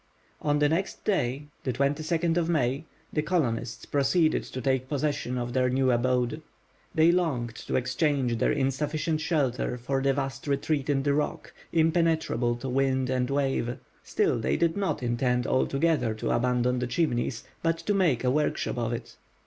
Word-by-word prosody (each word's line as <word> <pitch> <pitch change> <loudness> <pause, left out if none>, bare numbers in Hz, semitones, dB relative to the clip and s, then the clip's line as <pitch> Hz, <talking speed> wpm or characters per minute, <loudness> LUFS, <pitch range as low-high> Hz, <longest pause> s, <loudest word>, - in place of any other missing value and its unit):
On 145 -1 +1
the 145 0 +4
next 170 +6 -2
day, 140 - 0 0.2
May 130 - -1
22, 155 -1 +1 0.3
the 150 - +1
colonists 130 -9 -1
proceeded 155 +3 +2
to 130 - -6
take 130 0 0
possession 145 -3 -1
of 120 0 -3
their 130 0 +2
new 130 0 +2
abode. 125 +4 +1 0.5
They 160 +2 +6
longed 140 -10 0
to - - -1
exchange 130 -3 +1
their - - +2
insufficient 150 +3 -1
shelter 140 -6 0
for 135 +3 -1
the 135 0 +2
vast 135 -1 -4
retreat 140 0 0
in 135 -2 +2
the 145 0 +2
rock, 150 +1 -2 0.2
impenetrable 160 -7 +2
to 120 +3 -6
wind 130 0 +1
and 125 0 0
wave. 135 -3 0 0.2
Still - - 0
they 110 - 0
did 165 0 +1
not 195 -9 -1
intend 125 +1 +1
altogether 135 -3 +1
to 110 - -2
abandon 125 +1 +1
the 125 - -1
Chimneys, 120 -4 -1 0.2
but 165 0 +1
to 205 - -1
make 170 - +2
a 125 - +2
workshop 150 -3 0
of 115 0 -1
it. 115 0 -7
135 Hz, 160 wpm, -27 LUFS, 125-155 Hz, 0.5 s, They